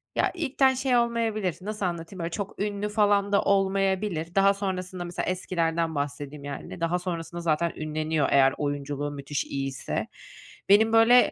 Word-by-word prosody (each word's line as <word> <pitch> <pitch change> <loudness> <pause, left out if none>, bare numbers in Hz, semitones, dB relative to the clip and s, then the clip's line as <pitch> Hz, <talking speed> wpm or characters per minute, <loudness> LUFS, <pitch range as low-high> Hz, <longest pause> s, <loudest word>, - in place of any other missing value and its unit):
ya, - - +2
ilkten 275 -5 +2
şey 255 -1 +1
olmayabilir, 225 -6 0
nasıl 210 +1 -3
anlatayım? 170 +1 -4
Böyle, 170 0 -3
çok 200 +1 -5
ünlü 205 0 -2
falan 205 -1 +2
da 200 - +4
olmayabilir. 195 -3 0
Daha 195 0 +5
sonrasında, 185 -2 -4
mesela, 175 0 -3
eskilerden 165 -3 -1
bahsedeyim, 145 0 -4
yani, 145 +4 -7
daha 170 +2 +1
sonrasında 175 -1 -5
zaten 170 0 +1
ünleniyor 155 -1 -1
eğer 135 -1 +5
oyunculuğu 145 0 -3
müthiş 145 0 -3
iyiyse. 135 -1 -3 0.6
Benim, 220 +3 +5
böyle, 230 +2 +6
180 Hz, 150 wpm, -26 LUFS, 155-205 Hz, 0.6 s, böyle